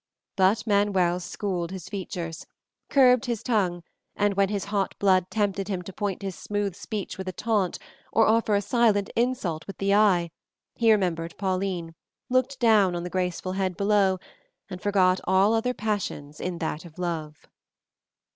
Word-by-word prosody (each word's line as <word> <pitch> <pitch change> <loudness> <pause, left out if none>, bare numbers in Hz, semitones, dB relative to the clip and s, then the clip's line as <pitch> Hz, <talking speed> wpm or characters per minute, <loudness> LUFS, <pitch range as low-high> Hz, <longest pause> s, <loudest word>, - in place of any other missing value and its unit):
But 200 +3 +3
Manuel 200 -4 +2
schooled 180 -2 -3
his 185 -3 -7
features, 175 -4 -5 0.4
curbed 250 -3 +5
his 235 -4 -3
tongue, 185 -8 0 0.3
and 205 0 +2
when 195 0 +2
his 200 -2 -2
hot 200 -2 -1
blood 185 -2 +3
tempted 200 -2 -1
him 190 -3 -3
to 195 - -9
point 200 -1 -3
his 195 -1 -3
smooth 205 -2 -2
speech 210 -2 -5
with 190 - -5
a - - -1
taunt, 205 -1 0 0.3
or 225 - +4
offer 220 -1 +3
a 200 - +1
silent 210 -2 +2
insult 230 -10 -1
with 195 - -8
the 200 0 +1
eye, 190 -5 +4 0.4
he 230 -1 +3
remembered 170 -5 0
Pauline, 185 -3 -2 0.4
looked 255 +1 +1
down 210 -6 +4
on 170 - -3
the 180 - -6
graceful 185 0 -2
head 185 -2 -2
below, 200 -2 +3 0.5
and 185 - -6
forgot 185 -2 +3
all 190 +3 +4
other 225 +2 +1
passions 195 -9 -3
in 180 -1 -3
that 160 -2 -3
of 170 -2 -14
love. 160 -4 -4
195 Hz, 165 wpm, -26 LUFS, 180-210 Hz, 0.5 s, curbed